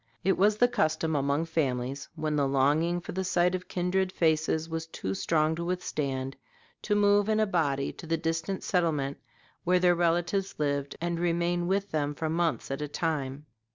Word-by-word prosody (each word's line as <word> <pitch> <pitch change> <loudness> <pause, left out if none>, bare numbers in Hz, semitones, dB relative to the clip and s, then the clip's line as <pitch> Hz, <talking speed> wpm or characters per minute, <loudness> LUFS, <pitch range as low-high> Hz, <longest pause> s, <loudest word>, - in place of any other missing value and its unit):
It 190 +2 +3
was 210 +2 +3
the 245 - +5
custom 160 -8 0
among 140 +3 +1
families, 135 -4 -2
when 155 -2 -1
the 140 -2 +2
longing 150 +6 +2
for - - -7
the 190 +1 -2
sight 180 -1 +2
of 185 0 -4
kindred 185 +1 0
faces 160 -1 +1
was 165 0 -4
too 95 -11 -4
strong 155 +8 +1
to 170 - -3
withstand, 140 -7 -2 0.5
to 210 - 0
move 205 0 +4
in 215 0 +2
a 215 - +4
body 145 -8 0
to 165 - -10
the 165 +1 +1
distant 165 +4 -2
settlement 150 -6 0 0.4
where 180 +1 +3
their 180 -1 +4
relatives 175 +3 0
lived 140 -2 -1
and 170 0 -1
remain 175 0 0
with 195 +2 0
them 145 -1 -1
for 160 0 -2
months 165 -4 0
at 135 - -3
a 150 - -2
time. 145 -2 -2
165 Hz, 185 wpm, -28 LUFS, 145-180 Hz, 0.5 s, the